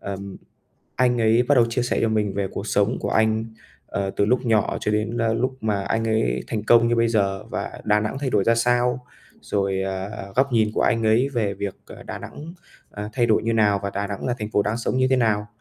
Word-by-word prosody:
ừm, 100 Hz, 0 st, -6 dB, 0.6 s
anh 125 Hz, -1 st, +2 dB
ấy 115 Hz, +2 st, +4 dB
bắt 135 Hz, +4 st, +2 dB
đầu 120 Hz, -3 st, +5 dB
chia 120 Hz, +1 st, 0 dB
sẻ 120 Hz, -, -1 dB
cho 115 Hz, -, +3 dB
mình 105 Hz, -2 st, 0 dB
về 100 Hz, -1 st, -1 dB
cuộc 100 Hz, -, -5 dB
sống 105 Hz, +3 st, +1 dB
của -, -, -2 dB
anh, 110 Hz, 0 st, +2 dB, 0.4 s
ờ, 100 Hz, -1 st, -2 dB
từ -, -, +3 dB
lúc 125 Hz, +4 st, +1 dB
nhỏ 110 Hz, -3 st, +1 dB
cho 105 Hz, -, -1 dB
đến, 110 Hz, +2 st, -1 dB
a, 115 Hz, -1 st, +1 dB
lúc 130 Hz, +3 st, -1 dB
mà 105 Hz, -3 st, -1 dB
anh 115 Hz, +3 st, -1 dB
ấy 65 Hz, -, 0 dB
thành 105 Hz, -2 st, -2 dB
công 115 Hz, +1 st, +5 dB
như 120 Hz, -, +1 dB
bây 115 Hz, 0 st, +3 dB
giờ 100 Hz, -4 st, 0 dB
và -, -, -5 dB
Đà 105 Hz, 0 st, +3 dB
Nẵng 105 Hz, +5 st, -3 dB
thay 135 Hz, -2 st, -2 dB
đổi 100 Hz, -, +2 dB
ra 115 Hz, -, +4 dB
sao, 120 Hz, +1 st, +1 dB, 0.3 s
rồi, 95 Hz, -1 st, -1 dB
ờ, 95 Hz, +1 st, -5 dB
góc 135 Hz, +1 st, +2 dB
nhìn 110 Hz, -2 st, +3 dB
của -, -, +1 dB
anh 115 Hz, 0 st, +2 dB
ấy 115 Hz, +5 st, +3 dB
về 110 Hz, -7 st, -1 dB
việc, 100 Hz, 0 st, -4 dB
ờ, -, -, -11 dB
Đà -, -, -7 dB
Nẵng, 160 Hz, +4 st, -9 dB, 0.4 s
à, 105 Hz, 0 st, -6 dB
thay 120 Hz, -2 st, +1 dB
đổi 110 Hz, -, +2 dB
như 115 Hz, -, 0 dB
nào 105 Hz, -3 st, +3 dB
và 100 Hz, -, -2 dB
Đà 100 Hz, +1 st, -3 dB
Nẵng 100 Hz, +4 st, -5 dB
là 125 Hz, -, 0 dB
thành 105 Hz, -1 st, -5 dB
phố 105 Hz, -, +2 dB
đang 105 Hz, +3 st, -1 dB
sống 120 Hz, -, -2 dB
như 130 Hz, 0 st, +3 dB
thế 130 Hz, -, +4 dB
nào. 110 Hz, -4 st, +1 dB
110 Hz, 250 wpm, -23 LUFS, 100-120 Hz, 0.6 s, đầu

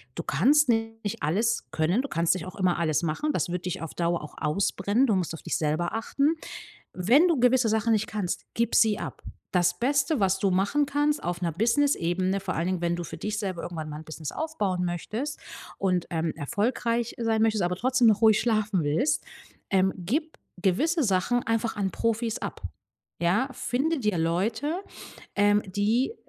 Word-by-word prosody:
du -, -, -4 dB
kannst 275 Hz, -, +3 dB
nicht 225 Hz, -2 st, -1 dB
alles 205 Hz, +10 st, 0 dB
können. 170 Hz, +9 st, +1 dB
Du 280 Hz, -, -5 dB
kannst 165 Hz, 0 st, +2 dB
nicht 180 Hz, -, -5 dB
auch 185 Hz, -, -9 dB
immer 185 Hz, -3 st, +1 dB
alles 155 Hz, -3 st, +1 dB
machen. 170 Hz, -, -1 dB
Das -, -, -1 dB
wird 180 Hz, 0 st, -4 dB
dich 180 Hz, -, -3 dB
auf 165 Hz, -, -6 dB
Dauer 170 Hz, 0 st, 0 dB
auch 150 Hz, -, -10 dB
ausbrennen. 195 Hz, -, +1 dB
Du 215 Hz, -, +2 dB
musst 180 Hz, -3 st, -1 dB
auf 165 Hz, -, -8 dB
dich -, -, -1 dB
selber 155 Hz, +3 st, -1 dB
achten. 280 Hz, +7 st, +1 dB, 0.6 s
Wenn 240 Hz, -, +4 dB
du 330 Hz, -5 st, +2 dB
gewisse 250 Hz, -1 st, +4 dB
Sachen 220 Hz, +1 st, +2 dB
nicht 215 Hz, -1 st, +1 dB
kannst, 200 Hz, -4 st, -3 dB
gib 235 Hz, 0 st, 0 dB
sie 215 Hz, -3 st, +4 dB
ab. -, -, -7 dB, 0.3 s
Das 180 Hz, -1 st, +2 dB
Beste, 280 Hz, +4 st, +1 dB
was 190 Hz, -1 st, +2 dB
du 195 Hz, 0 st, +1 dB
machen 200 Hz, +11 st, +2 dB
kannst 290 Hz, +1 st, 0 dB
auf 175 Hz, +1 st, -3 dB
'ner 170 Hz, -2 st, 0 dB
Businessebene, 195 Hz, -, +1 dB
vor 190 Hz, -1 st, -3 dB
allen 165 Hz, -, -1 dB
Dingen, 185 Hz, -1 st, -1 dB
wenn 170 Hz, 0 st, +1 dB
du 175 Hz, -, -4 dB
für 165 Hz, 0 st, -8 dB
dich 210 Hz, +5 st, -3 dB
selber 190 Hz, -5 st, -3 dB
irgendwann 160 Hz, -3 st, -5 dB
mal 150 Hz, -, -6 dB
'n 160 Hz, -, -10 dB
Business 155 Hz, -1 st, -6 dB
aufbauen 205 Hz, -, -2 dB
möchtest 215 Hz, -, -3 dB, 0.4 s
und, 180 Hz, -3 st, 0 dB
ähm, 160 Hz, -1 st, -1 dB
erfolgreich 230 Hz, -, -1 dB
sein 225 Hz, -2 st, +1 dB
möchtest, 220 Hz, -3 st, +2 dB
aber 175 Hz, +1 st, 0 dB
trotzdem 250 Hz, +3 st, +2 dB
noch 210 Hz, 0 st, +3 dB
ruhig 220 Hz, -2 st, +6 dB
schlafen 215 Hz, -5 st, +1 dB
willst, 150 Hz, +1 st, +1 dB, 0.5 s
ähm, 190 Hz, 0 st, +3 dB
gib 280 Hz, -, -3 dB, 0.2 s
gewisse 310 Hz, -, +2 dB
Sachen 210 Hz, +4 st, +1 dB
einfach 225 Hz, 0 st, -1 dB
an 195 Hz, -2 st, -1 dB
Profis 230 Hz, +1 st, -1 dB
ab, -, -, -6 dB, 0.6 s
ja? 185 Hz, +10 st, +2 dB
Finde 295 Hz, +6 st, -1 dB
dir 210 Hz, -5 st, 0 dB
Leute, 220 Hz, -, -1 dB, 0.5 s
ähm, 205 Hz, +1 st, +4 dB
die 215 Hz, -, 0 dB
205 Hz, 185 wpm, -27 LUFS, 175-235 Hz, 0.6 s, ruhig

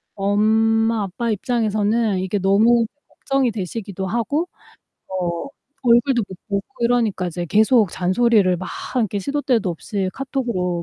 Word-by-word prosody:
엄마 220 Hz, +2 st, +2 dB
아빠 225 Hz, +5 st, -3 dB
입장에서는 215 Hz, -2 st, 0 dB
이게 190 Hz, +2 st, -1 dB
너무 220 Hz, +5 st, +4 dB, 0.2 s
걱정이 270 Hz, -3 st, -1 dB
되시기도 200 Hz, -1 st, -5 dB
하고 285 Hz, -, -1 dB, 0.6 s
어 175 Hz, -3 st, -3 dB, 0.4 s
얼굴도 240 Hz, +1 st, +4 dB
못 190 Hz, -, -9 dB
보고 200 Hz, -1 st, -1 dB, 0.2 s
이러니까 230 Hz, -6 st, +1 dB
이제 175 Hz, 0 st, -4 dB
계속 220 Hz, +1 st, +4 dB
잔소리를 190 Hz, +1 st, +2 dB
막 180 Hz, +1 st, -6 dB, 0.3 s
이렇게 215 Hz, -4 st, 0 dB
시도 280 Hz, +9 st, -2 dB
때도 230 Hz, -9 st, +1 dB
없이 190 Hz, +3 st, -3 dB
카톡으로 235 Hz, -11 st, -2 dB
215 Hz, 305 characters per minute, -21 LUFS, 190-235 Hz, 0.6 s, 너무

